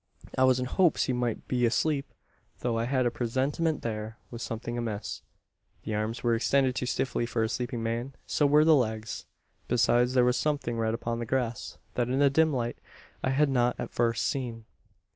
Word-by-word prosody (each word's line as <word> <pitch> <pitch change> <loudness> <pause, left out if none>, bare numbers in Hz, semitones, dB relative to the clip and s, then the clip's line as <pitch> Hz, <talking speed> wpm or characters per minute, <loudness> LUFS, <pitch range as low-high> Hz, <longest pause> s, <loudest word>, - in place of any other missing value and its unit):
"I 130 - +4
was 130 -1 +4
in 125 - -1
hopes 175 +6 +3
he 130 - 0
might 120 -2 -2
be 125 -1 0
asleep; 140 +4 +1 0.5
though 120 -2 0
I 115 0 0
had 130 0 +1
a 120 - +2
presentiment 135 +7 -1
there 110 0 -4
was 120 -1 -7
something 120 0 -4
amiss. 105 -6 -4 0.6
The 110 - -3
arms 110 +3 -2
were 120 -1 +3
extended 130 +3 +2
too 125 - -2
stiffly 125 -2 -1
for 115 -1 0
a - - +1
sleeping 120 -1 -3
man. 120 +4 -3
So 145 - +2
were 150 +2 +5
the 160 - +7
legs. 110 -5 -1 0.4
Besides, 120 +1 +3
there 125 -1 +5
was 125 0 +2
something 140 -5 -1
red 110 0 +1
upon 115 0 -3
the 120 - -4
grass, 120 -4 -2 0.2
that 120 -1 0
in 130 - 0
the 140 -1 +4
dim 160 +2 +4
light 120 -3 -2 0.4
I - - +1
had 140 +2 +3
not 125 -2 +2
at - - -4
first 115 -1 +1
seen. 120 -5 -3
120 Hz, 200 wpm, -28 LUFS, 115-130 Hz, 0.6 s, the